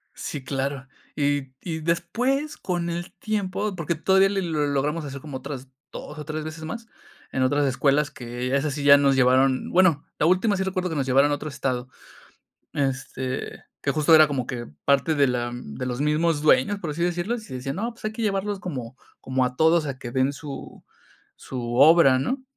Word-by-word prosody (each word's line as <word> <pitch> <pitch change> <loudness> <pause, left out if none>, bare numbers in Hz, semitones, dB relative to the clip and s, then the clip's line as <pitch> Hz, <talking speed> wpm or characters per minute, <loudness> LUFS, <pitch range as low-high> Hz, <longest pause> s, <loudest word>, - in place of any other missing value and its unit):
Sí, 140 -3 -5
claro. 135 0 -3 0.3
Y 145 -2 0
y 160 -3 -4
después 240 - -1
con 175 -2 -2
el 175 +1 -5
tiempo, 205 -1 -2
porque 170 -1 -2
todavía 190 +4 +4
le 195 -1 -1
logramos 150 -1 -1
hacer 140 -1 -7
como 145 -4 -6
otras 135 -1 -7 0.2
2 150 - -8
o 150 - -7
3 155 0 -4
veces 155 0 -7
más, 230 +7 -6 0.4
en 130 - 0
otras 145 +2 +2
escuelas 140 +2 +2
que 125 +2 -3
esas 140 0 0
sí 145 -1 -4
ya 140 0 +8
nos 140 -1 +3
llevaron, 130 0 +3
bueno, 175 -6 +4
la 150 - +3
última 185 +4 +3
sí 190 - 0
recuerdo 185 -1 -2
que 160 - -4
nos 135 -2 0
llevaron 135 +3 +4
a - - +2
otro 155 +1 -6
estado. 130 -2 -3 0.8
Este, 130 -1 -3 0.2
que 140 - +1
justo 155 +2 +3
era 155 -1 +7
como 130 -4 -2
que 120 -1 -5 0.2
parte 140 +3 +3
de 140 -2 +4
la 120 -1 -1
de 120 - -6
los 125 +2 -3
mismos 150 +1 +1
dueños, 155 +7 +3
por 165 - -4
así 170 +3 -2
decirlo, 175 +6 0
y - - -5
decía: 130 +1 -4
"No, 230 +6 -3
pues 230 - -19
hay 215 - -1
que 230 - -6
llevarlos 200 -1 -1
como 130 -8 -6 0.2
como 130 -1 0
a 125 0 -3
todos 160 +1 +4
a 135 -2 -4
que 120 -2 -7
den 130 +2 +1
su 140 -1 -9 0.5
su 130 -2 -7
obra", 140 -2 +6
¿no? 260 - -2
145 Hz, 195 wpm, -24 LUFS, 135-175 Hz, 0.8 s, ya